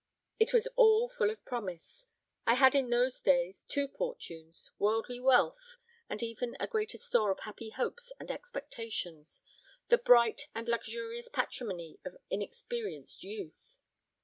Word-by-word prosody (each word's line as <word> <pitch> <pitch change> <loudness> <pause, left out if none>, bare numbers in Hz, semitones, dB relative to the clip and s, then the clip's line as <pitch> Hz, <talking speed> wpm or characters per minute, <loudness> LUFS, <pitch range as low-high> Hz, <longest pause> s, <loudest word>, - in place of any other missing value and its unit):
It 445 +3 +4
was 475 -2 +4
all 465 -1 +6
full 475 -3 +1
of 435 - -7
promise. 230 - -6 0.4
I 230 - +6
had 265 0 +7
in 270 -3 +3
those 245 +1 +2
days 180 0 +2
two 280 0 -1
fortunes: 170 - -7
worldly 225 +4 +1
wealth, - - +3 0.3
and 215 - -3
even 235 +1 -3
a - - 0
greater 440 0 -1
store 220 -4 +2
of 190 - -1
happy 220 +1 -7
hopes 480 - -3
and - - -5
expectations 220 - -5 0.5
the 480 - +6
bright 245 - +5
and 230 +1 -4
luxuriant 470 - -3
patrimony 180 - -3
of - - -8
inexperienced 475 -2 -4
youth. 435 +3 -9
255 Hz, 140 wpm, -32 LUFS, -, 0.5 s, had